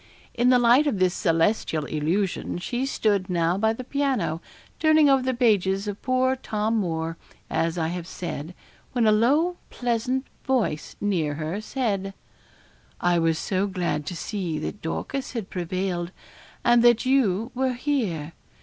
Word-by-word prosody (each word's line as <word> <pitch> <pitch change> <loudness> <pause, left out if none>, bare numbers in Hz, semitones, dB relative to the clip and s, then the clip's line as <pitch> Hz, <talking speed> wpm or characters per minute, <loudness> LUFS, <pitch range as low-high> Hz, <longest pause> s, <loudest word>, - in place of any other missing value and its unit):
In 245 +1 +2
the 255 - +6
light 245 +5 +5
of 235 - 0
this 185 -1 +2
celestial 165 -3 +1
illusion 170 +8 -1
she 240 +9 -2
stood 205 -7 0
now 170 -1 +1
by 220 +3 +2
the 225 +3 -5
piano, 265 - -1 0.4
turning 310 -1 +5
over 270 -1 +4
the 260 0 0
pages 200 -4 +2
of 205 -1 -5
poor 255 0 +2
Tom 220 -3 -1
Moore, 165 -4 -2 0.3
as 165 +1 0
I 160 -1 0
have 175 0 -5
said, 175 -2 -6 0.4
when 240 -3 +2
a 215 - +5
low 290 +12 +3
pleasant 245 +2 -1 0.2
voice 240 -13 -1
near 170 -8 0
her 160 +7 -3
said 200 -6 -2 0.8
'I 175 -1 +2
was 165 -1 +2
so 190 +3 0
glad 175 -6 -2
to 180 - -4
see 175 -3 -3
that 155 +6 -5
Dorcas 260 +12 -4
had 225 -6 -5
prevailed, 180 0 -2 0.5
and 240 0 +5
that 240 0 +5
you 235 -4 +2
were 260 0 0
here. 220 - -2
205 Hz, 155 wpm, -25 LUFS, 175-250 Hz, 0.8 s, the